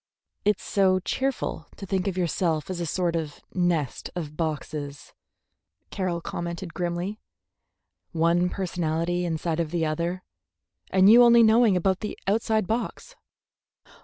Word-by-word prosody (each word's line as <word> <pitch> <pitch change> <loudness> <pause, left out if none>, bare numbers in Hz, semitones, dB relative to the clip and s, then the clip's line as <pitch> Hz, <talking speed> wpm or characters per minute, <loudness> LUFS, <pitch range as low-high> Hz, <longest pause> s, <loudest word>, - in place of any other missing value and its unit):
"It's 210 -1 +2
so 190 -2 +3
cheerful 235 - -2
to 200 - -8
think 190 0 -1
of 190 -2 -2
yourself 170 -2 0
as 180 - -4
a 170 - -2
sort 175 +1 0
of 155 -3 -4
nest 175 -7 -1
of 155 -4 -5
boxes," 150 -3 -4 0.8
Carroll 180 -4 -2
commented 170 0 -5
grimly, 175 +4 -3 0.9
"one 170 +2 +2
personality 175 -1 -1
inside 165 0 -2
of 165 -2 -1
the 165 0 0
other, 170 +4 -2 0.7
and 190 0 +5
you 230 +4 +9
only 235 -1 +7
knowing 220 -3 +5
about 190 +1 +1
the 210 - -5
outside 220 0 +1
box." 235 - -3
175 Hz, 135 wpm, -26 LUFS, 165-195 Hz, 0.9 s, you